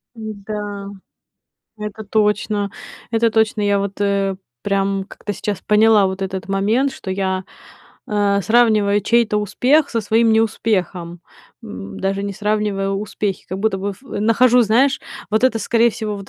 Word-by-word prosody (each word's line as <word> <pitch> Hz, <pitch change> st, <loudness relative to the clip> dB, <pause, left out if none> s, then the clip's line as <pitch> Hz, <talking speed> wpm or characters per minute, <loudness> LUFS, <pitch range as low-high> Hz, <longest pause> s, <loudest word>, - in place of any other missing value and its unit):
М-да. 205 Hz, -2 st, -6 dB, 0.9 s
Это 210 Hz, 0 st, -6 dB
точно. 210 Hz, -1 st, 0 dB, 0.4 s
Это 230 Hz, 0 st, +3 dB
точно, 220 Hz, -1 st, +1 dB
я 205 Hz, 0 st, +2 dB
вот, 200 Hz, 0 st, -4 dB
э, 200 Hz, -1 st, +1 dB, 0.3 s
прям 195 Hz, -1 st, 0 dB
как-то 205 Hz, -, -6 dB
сейчас 200 Hz, 0 st, -4 dB
поняла 210 Hz, -1 st, +4 dB
вот 190 Hz, +1 st, -5 dB
этот 190 Hz, 0 st, -4 dB
момент, 215 Hz, +8 st, +1 dB
что 190 Hz, -7 st, -6 dB
я, 190 Hz, -1 st, -1 dB, 0.6 s
а, 205 Hz, -1 st, +1 dB
сравниваю 215 Hz, -2 st, +3 dB
чей-то 230 Hz, 0 st, +2 dB
успех 265 Hz, +8 st, +2 dB
со 230 Hz, -, -1 dB
своим 225 Hz, +2 st, +3 dB
неуспехом, 185 Hz, -6 st, 0 dB, 0.4 s
м, 95 Hz, +1 st, -8 dB
даже 195 Hz, +1 st, -1 dB
не 200 Hz, -1 st, -3 dB
сравнивая 210 Hz, -1 st, -1 dB
успехи. 200 Hz, 0 st, -3 dB
Как 190 Hz, +2 st, -5 dB
будто 215 Hz, -2 st, 0 dB
бы 200 Hz, +1 st, -3 dB
в 195 Hz, -, -21 dB, 0.2 s
нахожу, 245 Hz, +3 st, +4 dB
знаешь, 245 Hz, +5 st, +3 dB, 0.3 s
вот 220 Hz, +3 st, +1 dB
это, 230 Hz, -3 st, +3 dB
скорее 230 Hz, +3 st, +3 dB
всего, 215 Hz, -2 st, -4 dB
вот 200 Hz, -1 st, -9 dB
205 Hz, 145 wpm, -19 LUFS, 195-220 Hz, 0.9 s, поняла